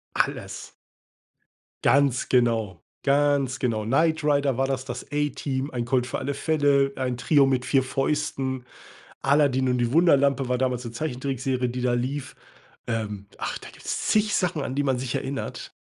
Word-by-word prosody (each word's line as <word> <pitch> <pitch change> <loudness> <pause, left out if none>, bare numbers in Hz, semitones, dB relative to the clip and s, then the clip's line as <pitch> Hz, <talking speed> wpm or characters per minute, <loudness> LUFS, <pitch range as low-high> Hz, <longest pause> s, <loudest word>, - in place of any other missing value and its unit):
Alles. - - -2 1.1
Ganz 140 -2 +3
genau 115 -8 +1 0.2
ganz 140 -2 +2
genau. 110 -5 -1
„Knight 155 +6 +2
Rider“ 140 -3 +2
war 135 0 +1
das, 135 -1 -3
„Das 120 -1 -5
A-Team“, 145 -2 -1
„Ein 120 -2 -2
Colt 125 0 +1
für - - -3
alle 140 - -2
Fälle“, 140 -2 +2
„Ein 125 -2 -2
Trio 145 +3 +4
mit 130 -1 +1
4 135 -1 +3
Fäusten“ 135 -1 -1 0.6
„Aladdin 135 -2 +3
und 125 - +2
die 120 0 0
Wunderlampe“ 140 -5 +4
war 125 - +1
damals 125 -1 -1
'ne 115 - -6
Zeichentrickserie, 130 -2 -2
die 125 +1 -4
da 125 -1 +2
lief 130 +3 -3 0.5
ähm, 105 -3 -3
ach, - - -3
da - - -11
gibt's - - -4
zig 210 -1 +3
Sachen, 175 -5 0
an 130 - -4
die 145 - +1
man 130 -3 +1
sich 130 -2 -3
erinnert. 135 +1 -4
130 Hz, 165 wpm, -25 LUFS, 125-140 Hz, 1.1 s, Trio